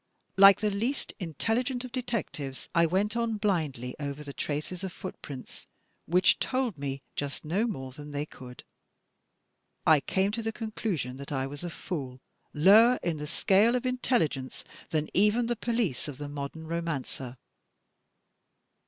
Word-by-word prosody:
Like 195 +1 +8
the 210 -1 +2
least 235 +8 -2
intelligent 230 - -1
of 250 - -8
detectives, 210 - -3
I 170 -1 +5
went 200 +6 +1
on 230 -2 0
blindly 155 - -1
over 145 0 -4
the 140 -1 -8
traces 155 +7 -3
of 190 - -3
footprints 145 -9 -8 0.4
which 180 +3 +4
told 255 -6 0
me 140 -1 -4
just 145 +2 -3
no 195 +9 +1
more 135 - -4
than 145 +3 -9
they 145 0 -2
could. 125 -4 -11 1.2
"I 155 -2 +7
came 190 +7 +1
to 230 +2 -3
the 225 0 -1
conclusion 210 - -3
that 140 +1 -8
I 135 -2 0
was 145 +3 -7
a 175 - -3
fool, 135 -7 -5 0.3
lower 215 +10 +7
in 170 -2 0
the 150 0 -5
scale 205 +9 +4
of 250 - -1
intelligence 235 - 0 0.3
than 155 -1 0
even 210 +5 +4
the 240 +1 0
police 230 - -1
of 145 -3 -6
the 145 0 -5
modem 145 +2 -6
romancer. 150 -6 -4
170 Hz, 155 wpm, -29 LUFS, 145-220 Hz, 1.2 s, Like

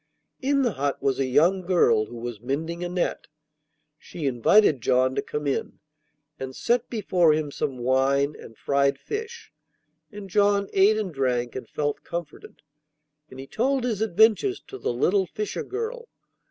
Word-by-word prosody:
In 275 +1 +2
the 240 - +1
hut 140 -4 -2
was 135 -1 0
a 135 - +1
young 170 +9 +3
girl 170 -12 +3
who 120 - -10
was 115 -2 -6
mending 160 +7 -3
a 175 - -3
net. 180 0 -2 0.7
She 160 - -7
invited 135 - +4
John 130 +2 +2
to - - -1
come 150 0 -5
in, 140 - -2 0.6
and 130 0 -6
set 240 +1 0
before 180 -8 +2
him 150 -1 -2
some 135 -2 -3
wine 135 +3 +1
and 115 - -13
fried 140 0 +1
fish, 450 - -7 0.6
and 205 -2 -9
John 200 +1 +2
ate 200 +3 +4
and 200 -6 -3
drank 125 -3 -1
and 130 - -7
felt 145 -1 -2
comforted, 170 -3 -8 0.7
and 130 - -12
he 135 - -7
told 255 - 0
his 225 -4 -2
adventures 220 - +3
to 400 - -8
the - - -1
little 185 +10 +1
fisher 210 +6 -4
girl. 460 +3 -5
170 Hz, 165 wpm, -25 LUFS, 135-215 Hz, 0.7 s, invited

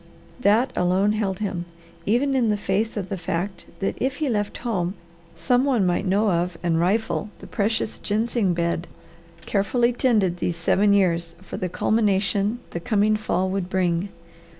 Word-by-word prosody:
That 230 +3 +3
alone 185 +3 +2
held 205 -3 -1
him, 190 -5 -3 0.4
even 255 +6 +2
in 250 -4 +2
the 210 - +2
face 205 +3 -1
of 190 -2 -3
the 195 -3 -3
fact 175 +3 -3
that 195 - 0
if 265 +1 0
he 300 -1 -1
left 205 -3 -1
home 185 -5 -1 0.4
some 250 0 +2
one 250 -8 +2
might 180 +2 0
know 205 +2 +2
of 175 0 0
and 165 -2 +2
rifle 210 +4 0
the - - -12
precious 220 0 -1
ginseng 215 -3 0
bed, 170 0 -1 0.6
carefully 235 +5 +1
tended 215 -8 +2
these 175 -1 -2
seven 200 +4 +3
years 170 -4 +1
for - - -7
the 180 - -2
culmination 205 +1 +1
the 170 - -3
coming 215 +2 +2
fall 190 -3 -1
would 190 -2 -2
bring. 180 0 0
200 Hz, 165 wpm, -24 LUFS, 180-220 Hz, 0.6 s, That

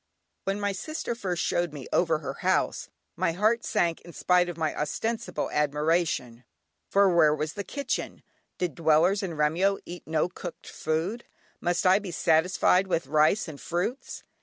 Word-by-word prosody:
When 195 +1 -1
my 205 0 0
sister 275 - -4
first 185 -7 -2
showed 175 -3 0
me 140 -3 -7
over 165 -3 +3
her 140 -3 -5
house, - - 0 0.3
my 165 - 0
heart 215 +6 +2
sank 170 -1 0
in 170 - -13
spite 180 +1 +2
of 175 - -6
my 160 -2 -1
ostensible 225 +10 -2
admiration, 150 -4 0 0.5
for 195 -3 +4
where 155 -3 +5
was 155 0 -3
the 200 - -4
kitchen? 280 +7 -4 0.3
Did 180 -4 -1
dwellers 165 +5 +3
in 180 -5 -4
Remyo 170 +7 +2
eat 175 0 -9
no 160 +1 +1
cooked 180 -1 -9
food; 165 +9 -2 0.3
must 175 +1 0
I 185 +2 +6
be 200 -3 -7
satisfied 180 +3 +3
with 170 -4 0
rice 155 +8 +3
and 150 -3 -9
fruits? 180 +10 -3
175 Hz, 160 wpm, -27 LUFS, 155-195 Hz, 0.5 s, I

